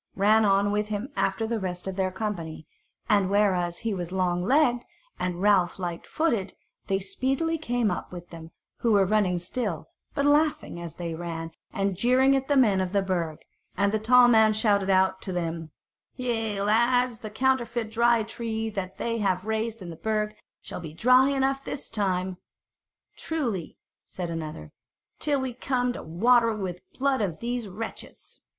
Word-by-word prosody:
ran 215 +3 +4
on 200 0 +3
with 210 0 0
him 215 +4 -3
after 195 +3 0
the 225 0 -1
rest 180 -2 -4
of 190 -1 -4
their 190 -1 0
company; 180 -6 -5 0.4
and 200 -4 +3
whereas 185 -4 +2
he 225 - +1
was 175 -2 -4
long 180 -2 0
legged 245 +1 +3 0.4
and 180 0 -2
Ralph 195 -4 +3
lightfooted, 190 - -2 0.3
they 195 - +1
speedily 265 - -1
came 245 -7 0
up 180 - -5
with 175 -1 -9
them, 165 -1 -9 0.3
who 230 -2 +1
were 200 -1 +5
running 190 -3 +2
still, 175 - -3 0.3
but 280 - +1
laughing 290 - +2
as 170 -2 -7
they 170 -2 -4
ran, 165 0 -5 0.2
and 195 -1 -1
jeering 255 +7 +4
at 270 0 -1
the 285 - +2
men 210 -7 +4
of 185 0 -3
the 200 -1 +2
Burg; 170 -5 -2 0.3
and 200 +1 +2
the 220 - 0
tall 245 +3 +6
man 220 -2 +5
shouted 205 -3 +2
out 190 0 +3
to 190 - -5
them: 165 -2 -3 0.5
"Yea, 225 -5 -1
lads, 235 +2 +2
the 215 - -7
counterfeit 235 -1 0
Dry 235 0 +3
Tree 225 0 -4
that 190 -2 -5
they 230 -1 -2
have 190 -2 0
raised 220 -1 -2
in 175 - -7
the - - -8
Burg 215 +2 -1 0.3
shall - - -6
be 160 -3 -8
dry 255 +8 +5
enough 270 0 0
this 275 - -6
time." 185 -3 -1 0.8
"Truly," 240 - -3 0.3
said 175 -2 -6
another, 155 - -6 0.5
"till 290 -2 +1
we 260 -2 -3
come 250 0 -1
to - - -7
water 230 +8 +3
it 220 - -2
with 185 -3 -4
the - - -29
blood 270 -2 +1
of 175 -6 -2
these 240 -1 -3
wretches." 210 +4 -8
210 Hz, 175 wpm, -26 LUFS, 185-240 Hz, 0.8 s, tall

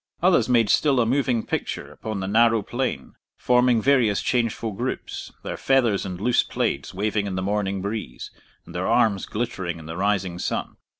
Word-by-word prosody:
Others 175 -10 +4
made 115 -3 +4
still 140 -4 +3
a 120 - +3
moving 125 -2 +1
picture - - -4
upon 110 -3 -5
the 95 - -3
narrow 115 +1 +3
plain, 125 +4 -3 0.2
forming 125 -1 +3
various 120 -8 +3
changeful 115 -2 0
groups, 95 - -5
their - - -4
feathers 120 -8 +2
and 90 -1 -6
loose 120 +4 +3
plaids - - -2
waving 105 +1 -1
in 95 - -3
the 95 - -2
morning 100 -1 -1
breeze, 100 - -5 0.3
and - - -12
their - - -2
arms 100 -4 +2
glittering 95 -7 -3
in 80 - -11
the 80 +1 -6
rising 95 -3 0
sun. - - -3
110 Hz, 175 wpm, -24 LUFS, 95-120 Hz, 0.3 s, Others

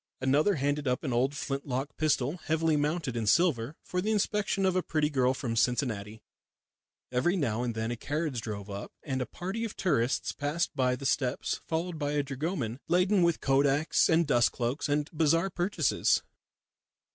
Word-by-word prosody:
Another 145 +9 +3
handed 145 0 -1
up 125 +4 0
an 130 -5 -2
old 130 +4 +1
flint 140 0 -4
lock 135 +2 -3
pistol, 150 0 +1
heavily 160 -1 +1
mounted 150 -3 -1
in 115 -2 -2
silver, 145 -2 +2
for 180 - -2
the 210 - -1
inspection 210 -2 +1
of 185 -1 +2
a 185 - +3
pretty 155 -3 0
girl 130 -2 +2
from 120 -4 -3
Cincinnati. 110 -3 -1 0.9
Every 130 +9 +2
now 120 - 0
and 120 -2 -2
then 110 +1 -2
a - - -2
carriage 145 0 -2
drove 105 -3 -6
up, 100 -1 -6
and 130 -3 -2
a 125 - -2
party 190 +6 -4
of 225 - -4
tourists 135 -8 0
passed 150 +4 -1
up 125 -2 +1
the 135 - -8
steps, 130 -1 0
followed 165 0 -2
by 145 -1 -1
a 145 -1 +1
dragoman 135 - -3
laden 180 +2 +3
with 170 -1 +2
kodaks, 140 +3 +3
and 165 +1 +4
dust 120 -5 +3
cloaks, 130 +5 -2
and 145 0 +1
bazaar 165 +4 +2
purchases. 180 +4 +1
145 Hz, 180 wpm, -29 LUFS, 125-165 Hz, 0.9 s, and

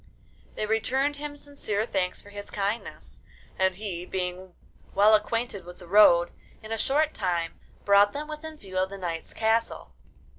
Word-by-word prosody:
They 215 - -1
returned 265 +7 +1
him 290 0 -6
sincere 250 -8 -3
thanks 185 -5 -2
for 205 - -14
his 205 0 -8
kindness, 205 +3 -4 0.4
and 190 -1 +3
he, 185 -4 -5
being 180 0 -4 0.4
well 205 +2 +6
acquainted 215 -1 +1
with 180 +1 -11
the 180 - -13
road, 175 -3 +6 0.3
in 215 - -9
a 225 - 0
short 300 +5 +2
time 175 -4 -2 0.3
brought 200 0 +6
them 295 +1 -5
within 310 0 -7
view 185 -7 -4
of 190 0 +1
the 200 - -7
knight's 170 -3 -4
castle. 225 +1 0
205 Hz, 160 wpm, -27 LUFS, 185-230 Hz, 0.4 s, well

